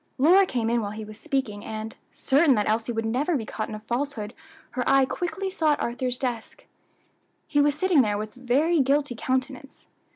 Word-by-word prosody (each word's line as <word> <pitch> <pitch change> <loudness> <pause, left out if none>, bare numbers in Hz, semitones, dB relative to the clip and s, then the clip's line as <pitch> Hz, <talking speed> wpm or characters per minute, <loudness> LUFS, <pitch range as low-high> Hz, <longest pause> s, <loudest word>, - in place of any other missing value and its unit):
Lora 360 +8 +5
came 230 -5 -1
in 235 0 +2
while 205 - -3
he 220 - -6
was 215 +1 -11
speaking 225 -7 -2
and, 220 0 -6 0.2
certain 280 0 +3
that 210 -1 0
Elsie 225 +2 0
would 225 -1 -2
never 280 +8 0
be 225 - -5
caught 215 0 -4
in 215 - -5
a - - -7
falsehood, 235 -1 -3 0.4
her 250 - -2
eye 275 -1 +5
quickly 380 +6 -3
sought 310 -5 +1
Arthur's 250 +1 -2
desk. 245 -3 -4 0.8
He 290 -1 +2
was 290 0 +3
sitting 360 -3 +4
there 210 -4 0
with 215 +2 -6
a - - -16
very 290 +7 +2
guilty 275 0 +2
countenance. 260 +3 -3
255 Hz, 195 wpm, -25 LUFS, 225-290 Hz, 0.8 s, Lora